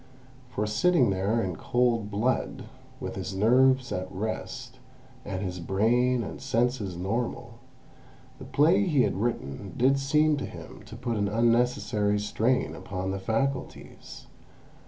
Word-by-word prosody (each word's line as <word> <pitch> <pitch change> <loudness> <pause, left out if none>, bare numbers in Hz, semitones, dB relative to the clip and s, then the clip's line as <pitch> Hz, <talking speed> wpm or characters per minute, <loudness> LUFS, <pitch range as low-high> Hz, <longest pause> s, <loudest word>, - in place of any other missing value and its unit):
For 105 -4 -2
sitting 130 - +3
there 100 +5 0
in 90 -3 -3
cold 120 -4 +1
blood, 115 +5 -1 0.4
with - - -5
his 95 - -5
nerves 130 +5 +4
at 90 0 -3
rest, 110 +4 -5 0.4
and 95 -1 -4
his 90 -2 -4
brain 115 +7 +2
and - - -7
senses 115 -6 0
normal, 110 +7 -3 0.8
the - - -9
play 170 +8 +3
he 145 -7 +3
had - - 0
written 100 - -3
did 135 +3 +3
seem 150 +2 +3
to 140 - -3
him - - -10
to - - -9
put 120 -3 -3
an 100 -1 +1
unnecessary 115 -2 +2
strain 110 +4 0
upon 95 -1 -4
the 95 - -3
faculties. 130 +7 -3
115 Hz, 135 wpm, -27 LUFS, 100-125 Hz, 0.8 s, nerves